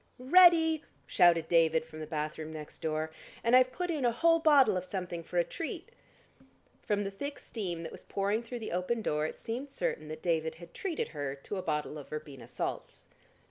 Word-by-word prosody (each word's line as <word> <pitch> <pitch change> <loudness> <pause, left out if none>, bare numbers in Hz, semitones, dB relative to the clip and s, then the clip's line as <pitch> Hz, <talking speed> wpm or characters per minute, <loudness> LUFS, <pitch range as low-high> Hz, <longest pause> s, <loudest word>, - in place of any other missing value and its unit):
"Ready!" 320 +2 +6 0.2
shouted 170 -2 +4
David 165 -1 +3
from 155 -1 -11
the 155 - -6
bathroom 155 +1 -4
next 155 -1 -9
door. 155 0 -2 0.3
"And 235 +2 +5
I've 255 0 +6
put 360 +5 -2
in 300 -5 -2
a 240 - +4
whole 330 +7 +4
bottle 280 -9 +5
of 180 - -1
something 180 -2 -4
for 175 +2 -6
a 175 - +5
treat." 330 - -6 0.9
From 205 -1 0
the 195 - -3
thick 285 +9 -5
steam 175 -7 -5
that - - -6
was - - -10
pouring 200 +3 -1
through 235 0 -7
the 220 - -5
open 185 +6 -1
door 150 -3 0
it - - -8
seemed 250 +5 -4
certain 155 - -2
that 155 +1 -8
David 160 -2 0
had 170 0 -13
treated 365 -5 -3
her 145 -3 -4
to 205 - -4
a - - -2
bottle 150 -2 -2
of 145 - -11
verbena 145 -5 -7
salts. - - -5
180 Hz, 200 wpm, -31 LUFS, 155-255 Hz, 0.9 s, Ready